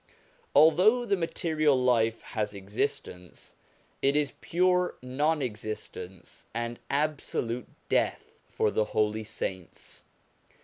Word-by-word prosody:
Although 195 Hz, +10 st, +6 dB
the 200 Hz, -, +2 dB
material 155 Hz, -4 st, +1 dB
life 115 Hz, -3 st, +2 dB
has 105 Hz, -1 st, -3 dB
existence, 95 Hz, -3 st, -4 dB, 0.5 s
it 140 Hz, +1 st, +3 dB
is 150 Hz, -2 st, +1 dB
pure 180 Hz, +1 st, +2 dB
non 145 Hz, +4 st, +1 dB
existence 105 Hz, -5 st, -7 dB
and 120 Hz, 0 st, -3 dB
absolute 140 Hz, -5 st, -1 dB, 0.2 s
death -, -, 0 dB, 0.2 s
for 105 Hz, -, +1 dB
the 110 Hz, -, +1 dB
holy 110 Hz, +1 st, +2 dB
saints. 95 Hz, -4 st, -6 dB
125 Hz, 100 wpm, -29 LUFS, 110-155 Hz, 0.5 s, Although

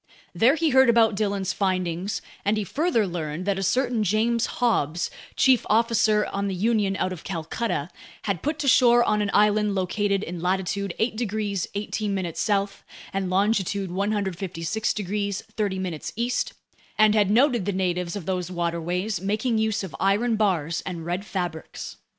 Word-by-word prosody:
There 250 Hz, +6 st, +4 dB
he 320 Hz, -1 st, +1 dB
heard 265 Hz, -1 st, +6 dB
about 230 Hz, -1 st, +5 dB
Dillon's 200 Hz, -2 st, -1 dB
findings, 185 Hz, 0 st, -1 dB, 0.2 s
and 210 Hz, +2 st, +1 dB
he 215 Hz, -, 0 dB
further 270 Hz, -, +1 dB
learned 170 Hz, -1 st, -4 dB
that 200 Hz, -1 st, 0 dB
a -, -, -2 dB
certain 245 Hz, +3 st, +1 dB
James 220 Hz, +4 st, +1 dB
Hobbs, 175 Hz, -, 0 dB, 0.2 s
chief 260 Hz, -2 st, +4 dB
officer 215 Hz, -1 st, +3 dB
on 200 Hz, 0 st, -1 dB
the 195 Hz, -, -2 dB
Union 205 Hz, 0 st, +1 dB
out 185 Hz, -, -1 dB
of 170 Hz, -, -10 dB
Calcutta, 165 Hz, -1 st, -3 dB, 0.4 s
had 200 Hz, -6 st, -2 dB
put 300 Hz, +1 st, -1 dB
to 285 Hz, -, -3 dB
shore 240 Hz, -2 st, +6 dB
on 210 Hz, -2 st, +1 dB
an 205 Hz, -, 0 dB
island 210 Hz, 0 st, +3 dB
located 200 Hz, +2 st, 0 dB
in 175 Hz, -2 st, -6 dB
latitude 190 Hz, +1 st, -1 dB
8 220 Hz, 0 st, 0 dB
degrees 210 Hz, -4 st, -2 dB
18' 200 Hz, -4 st, -2 dB
south 200 Hz, 0 st, -1 dB, 0.3 s
and 195 Hz, -1 st, -1 dB
longitude 195 Hz, -1 st, +1 dB
156 195 Hz, -1 st, -1 dB
degrees 200 Hz, 0 st, -2 dB
30' 190 Hz, -6 st, -2 dB
east, 240 Hz, +2 st, -1 dB, 0.4 s
and 215 Hz, 0 st, +5 dB
had 210 Hz, -3 st, +3 dB
noted 240 Hz, -1 st, +3 dB
the 205 Hz, -, 0 dB
natives 180 Hz, -2 st, -1 dB
of 200 Hz, -5 st, -5 dB
those 180 Hz, -1 st, -2 dB
waterways 175 Hz, +2 st, -2 dB
making 220 Hz, +4 st, 0 dB
use 220 Hz, -2 st, 0 dB
of 190 Hz, -, -7 dB
iron 210 Hz, +5 st, +2 dB
bars 170 Hz, -7 st, 0 dB
and 170 Hz, -3 st, -5 dB
red 180 Hz, +4 st, -3 dB
fabrics. 175 Hz, -5 st, -5 dB
200 Hz, 160 wpm, -25 LUFS, 185-220 Hz, 0.4 s, heard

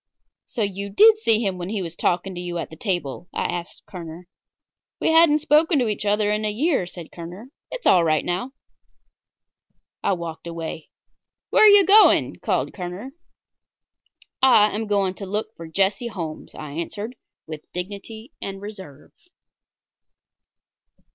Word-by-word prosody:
"So, 225 Hz, -, -2 dB
you 200 Hz, 0 st, -4 dB
did 430 Hz, -, +6 dB
see 225 Hz, -, +2 dB
him 190 Hz, -2 st, -2 dB
when 175 Hz, +1 st, -5 dB
he 205 Hz, -3 st, -2 dB
was 165 Hz, -1 st, -7 dB
talking 185 Hz, +2 st, -1 dB
to 175 Hz, -, -6 dB
you 175 Hz, -1 st, -4 dB
at 170 Hz, -, -5 dB
the -, -, -9 dB
table?" 175 Hz, -, -3 dB
I -, -, -2 dB
asked 175 Hz, -1 st, -5 dB
Kerner. 170 Hz, -1 st, -9 dB, 0.7 s
"We -, -, +2 dB
hadn't 320 Hz, -2 st, +5 dB
spoken 310 Hz, +2 st, +3 dB
to 250 Hz, -3 st, +1 dB
each 210 Hz, -1 st, -2 dB
other 210 Hz, 0 st, +2 dB
in 210 Hz, +1 st, -1 dB
a 215 Hz, -, 0 dB
year," 250 Hz, -, 0 dB
said 175 Hz, -2 st, -10 dB
Kerner. 180 Hz, +9 st, -10 dB, 0.2 s
"It's -, -, -7 dB
all 180 Hz, -2 st, +5 dB
right 155 Hz, -2 st, +1 dB
now." 185 Hz, +10 st, -3 dB, 1.5 s
I -, -, +1 dB
walked 170 Hz, -2 st, -6 dB
away. 165 Hz, -1 st, -6 dB, 0.6 s
"Where -, -, +5 dB
are -, -, +9 dB
you 405 Hz, -2 st, +7 dB
going?" 415 Hz, +4 st, +5 dB
called -, -, -1 dB
Kerner. 185 Hz, +7 st, -7 dB, 1.3 s
"I 220 Hz, -5 st, +5 dB
am 220 Hz, +1 st, -3 dB
going 200 Hz, -2 st, +1 dB
to 195 Hz, 0 st, -8 dB
look 210 Hz, +3 st, -4 dB
for 165 Hz, -, -9 dB
Jesse 195 Hz, -, 0 dB
Holmes," 170 Hz, -8 st, -7 dB
I 150 Hz, -2 st, -8 dB
answered, 205 Hz, -, -5 dB, 0.3 s
with 155 Hz, -1 st, -10 dB
dignity 205 Hz, -, -7 dB
and 195 Hz, 0 st, -5 dB
reserve. 190 Hz, -9 st, -11 dB
195 Hz, 155 wpm, -23 LUFS, 175-225 Hz, 1.5 s, are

